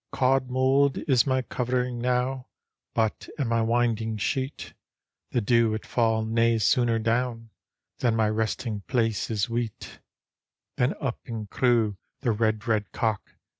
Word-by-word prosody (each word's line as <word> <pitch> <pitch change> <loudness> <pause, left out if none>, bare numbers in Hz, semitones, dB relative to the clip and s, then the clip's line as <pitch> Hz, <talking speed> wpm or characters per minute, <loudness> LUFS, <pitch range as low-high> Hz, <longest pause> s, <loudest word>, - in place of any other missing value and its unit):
" - - -56
Cauld 130 0 +2
mould 135 +2 +3
is 130 -5 +4
my 130 -1 +1
covering 125 0 -2
now. 125 +1 -1 0.5
But 110 -2 0
and 140 -5 -1
my 115 0 +1
winding 115 -1 +1
sheet; 130 +6 -3 0.6
The 120 - 0
dew 115 0 +3
it 110 - -6
fall 115 -2 +1
nae 115 +1 +2
sooner 115 +2 +2
down 115 0 -1 0.5
Then 120 -2 +2
my 110 -1 +2
resting 110 0 -2
place 115 -4 0
is 110 0 0
weet" 115 -2 -4 0.8
Then 125 +3 +1
up 135 -4 -3
and 110 -3 -5
crew 115 -5 +2 0.2
the 125 -4 +1
red, 110 0 0
red 105 -3 0
cock. 110 -3 -2
115 Hz, 145 wpm, -26 LUFS, 110-125 Hz, 0.8 s, is